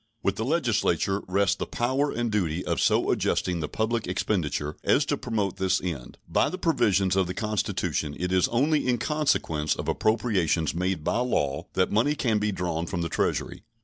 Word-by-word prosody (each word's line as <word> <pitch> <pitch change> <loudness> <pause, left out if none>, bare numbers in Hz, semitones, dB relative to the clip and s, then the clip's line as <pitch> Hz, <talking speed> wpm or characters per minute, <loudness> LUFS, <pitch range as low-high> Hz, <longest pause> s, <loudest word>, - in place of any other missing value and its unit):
With - - +1
the 110 - -2
Legislature 105 - +1
rest 100 +1 +1
the - - -3
power 130 +4 0
and 120 -2 -2
duty 90 -5 -1
of - - 0
so - - +3
adjusting 90 -2 0
the 75 - -3
public 110 -1 -1
expenditure 85 -6 -1
as 145 - +3
to 145 - 0
promote 110 -8 -2
this 95 0 +1
end. 80 -9 -5
By - - +2
the 185 - -5
provisions 100 - +2
of 95 -2 +2
the 90 - -5
Constitution 105 -8 -1
it 90 +1 -2
is 95 -1 +3
only 145 +4 +1
in 125 -1 +2
consequence 110 - 0
of - - -5
appropriations 95 - +1
made 90 -1 -1
by 115 - 0
law 75 - -1
that 95 - +1
money 120 +8 +2
can 115 -7 +1
be 105 0 0
drawn 85 -3 -2
from 90 -2 -2
the 85 - -2
Treasury. - - -1
100 Hz, 185 wpm, -26 LUFS, 90-120 Hz, -, so